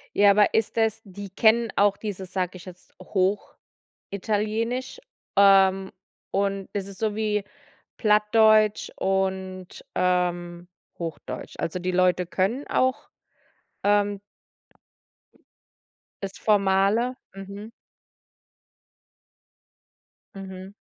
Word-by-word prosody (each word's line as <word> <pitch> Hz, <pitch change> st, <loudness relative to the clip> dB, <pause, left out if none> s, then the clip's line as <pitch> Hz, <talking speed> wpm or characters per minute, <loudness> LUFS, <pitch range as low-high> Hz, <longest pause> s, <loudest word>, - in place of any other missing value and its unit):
Ja, 205 Hz, 0 st, +6 dB
aber 205 Hz, 0 st, +4 dB
ist 220 Hz, -1 st, 0 dB
das 225 Hz, -2 st, +1 dB
die 200 Hz, +1 st, -9 dB
kennen 225 Hz, +2 st, +3 dB
auch 205 Hz, 0 st, +4 dB
dieses, 195 Hz, -4 st, -7 dB
sage 185 Hz, -1 st, -2 dB
ich 175 Hz, -, -13 dB
jetzt, 180 Hz, -1 st, -13 dB
Hochitalienisch? 215 Hz, -, -3 dB, 0.4 s
Ähm, 195 Hz, -1 st, +5 dB, 0.4 s
und 195 Hz, -1 st, -1 dB
ist 200 Hz, -1 st, -3 dB
das 195 Hz, -, -11 dB
so 215 Hz, 0 st, -1 dB
wie 210 Hz, -1 st, 0 dB, 0.5 s
Plattdeutsch 215 Hz, 0 st, +4 dB
und, 190 Hz, -1 st, -2 dB
ähm, 175 Hz, -1 st, 0 dB, 0.3 s
Hochdeutsch? 165 Hz, -3 st, -6 dB
Also, 165 Hz, +2 st, -2 dB
die 185 Hz, +1 st, -2 dB
Leute 180 Hz, 0 st, +2 dB
können 195 Hz, +10 st, -1 dB
auch, 260 Hz, 0 st, 0 dB, 0.8 s
ähm 205 Hz, 0 st, +2 dB, 2.0 s
das 195 Hz, 0 st, -5 dB
formale? 205 Hz, +4 st, +2 dB, 0.2 s
Mhm. 200 Hz, +2 st, -9 dB, 2.7 s
Mhm. 190 Hz, 0 st, -9 dB
195 Hz, 90 wpm, -25 LUFS, 185-210 Hz, 2.7 s, Ja